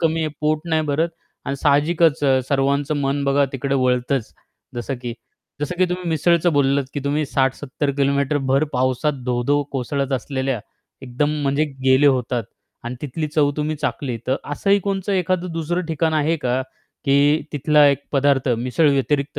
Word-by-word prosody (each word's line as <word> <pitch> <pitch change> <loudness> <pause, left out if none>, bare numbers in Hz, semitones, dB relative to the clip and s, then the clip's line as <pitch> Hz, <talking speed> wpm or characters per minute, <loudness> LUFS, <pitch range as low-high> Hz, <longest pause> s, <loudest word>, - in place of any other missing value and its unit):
कमी 165 -1 +1
आहे. 155 - 0
पोट 155 0 +1
नाही 160 -1 +2
भरत 160 +4 +1 0.4
आणि 140 - -3
साहजिकच 150 +2 +2
अ, 135 -1 +4
सर्वांचं 140 +2 +1
मन 140 +1 0
बघा 140 +1 +3
तिकडे 135 +1 -2
वळतंच. 125 -1 0 0.4
जसं 120 +3 -3
की 120 -2 -4 0.5
जसं 150 +4 -2
की 185 - +5
तुम्ही 180 0 -3
मिसळचं 170 +2 +2
बोललात 140 -1 +2
की 145 - -2
तुम्ही 150 +2 0
60-70 135 +2 -1
किलोमीटर 140 +1 +1
भर 135 +3 +3
पावसात 130 +2 0
धो-धो 125 +4 +1
कोसळत 135 +1 -2
असलेल्या 130 -2 -2 0.4
एकदम 135 +3 -1
म्हणजे 140 +2 +1 0.2
गेले 130 +2 +5
होतात 125 -3 +1 0.4
आणि 120 - -4
तिथली 150 +2 -3
चव 150 -1 +2
तुम्ही 150 +1 -1
चाखली. 135 -4 -3
तर 130 - +1 0.2
असंही 200 +7 +2
कोणतं 195 0 -2
एखादं 180 -1 0
दुसरं 165 +2 -2
ठिकाण 160 0 0
आहे 155 +2 +1
का 130 -3 -1 0.5
की 145 +2 +4
तिथला 150 0 +4
एक 140 -1 +2
पदार्थ 140 -1 +2
मिसळ 130 +5 +2
व्यतिरिक्त 140 +1 0
145 Hz, 160 wpm, -21 LUFS, 135-155 Hz, 0.5 s, की